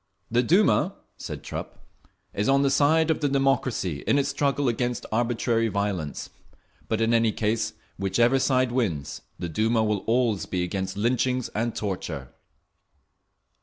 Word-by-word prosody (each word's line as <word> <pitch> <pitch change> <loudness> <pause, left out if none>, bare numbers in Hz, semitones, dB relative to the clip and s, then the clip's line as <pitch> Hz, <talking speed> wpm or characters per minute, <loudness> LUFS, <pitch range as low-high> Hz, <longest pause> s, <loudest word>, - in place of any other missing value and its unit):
"The 120 +1 +4
Duma," 190 - +3 0.2
said - - -7
Trupp, - - -7 0.5
"is 105 +4 0
on 135 +1 +4
the 135 - +2
side 155 +3 +3
of 160 - 0
the 145 - +2
democracy 135 - 0
in - - +4
its 140 0 +1
struggle 140 0 0
against 120 0 -1
arbitrary 115 0 +1
violence; 100 -8 -3 0.6
but 110 0 -1
in 115 +1 +2
any 115 -1 +3
case, 110 +1 -1 0.3
whichever 120 +7 +3
side 130 -2 +2
wins, 85 - -2 0.2
the 85 - -4
Duma 110 +7 +1
will 105 -2 +1
always 115 -3 +1
be 90 -1 -1
against 95 +1 -3
lynchings 125 +3 0
and 115 +2 -2
torture…." 100 -4 -4
115 Hz, 145 wpm, -25 LUFS, 105-135 Hz, 0.6 s, The